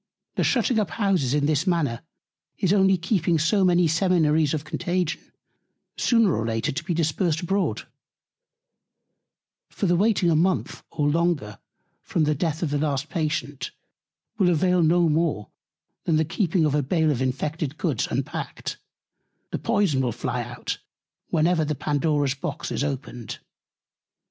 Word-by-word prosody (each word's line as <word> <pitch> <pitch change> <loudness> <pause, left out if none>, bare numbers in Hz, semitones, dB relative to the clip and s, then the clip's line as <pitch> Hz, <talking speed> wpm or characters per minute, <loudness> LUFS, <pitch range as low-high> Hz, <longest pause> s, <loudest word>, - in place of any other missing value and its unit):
The - - 0
shutting 240 -2 +2
up 210 - 0
Houses 185 - +1
in 145 -1 +1
this 155 +2 +1
Manner 155 -10 0 0.6
is 190 0 +2
only 195 -1 +4
keeping 170 -2 +1
so 165 +6 +2
many 175 -1 +4
Seminaries 160 -3 +2
of 150 - -4
Contagion, 175 0 -2 0.7
sooner 230 - +3
or 110 - -1
later 115 0 -1
to 135 - -4
be 170 -1 -2
dispersed 165 0 0
abroad: 190 +2 -1 1.8
For - - -3
the 175 -1 +3
waiting 190 -2 +3
a - - +3
Month, 180 +4 0
or 145 -2 -1
longer, 150 -10 0 0.4
from 160 - 0
the 150 0 +2
Death 160 +2 -2
of 155 - -1
the 145 - 0
last 145 -1 -1
Patient 150 -4 -2 0.7
will 185 -3 +4
avail 180 +2 +3
no 170 +1 +4
more, 155 -9 0 0.5
than 160 - +2
keeping 170 0 +1
a 150 0 +2
Bale 160 +2 +1
of 130 -3 -2
infected 145 +3 -2
Goods - - -1
unpack'd; - - -4 0.7
the - - -2
Poyson 200 - +1
will 125 -2 0
fly 120 +2 -3
out, 120 +1 -5 0.5
whenever 165 +1 +2
the 150 0 -1
Pandora's 145 0 0
Box 145 +2 -5
is - - -1
opened. 135 -5 -5
160 Hz, 145 wpm, -24 LUFS, 145-180 Hz, 1.8 s, only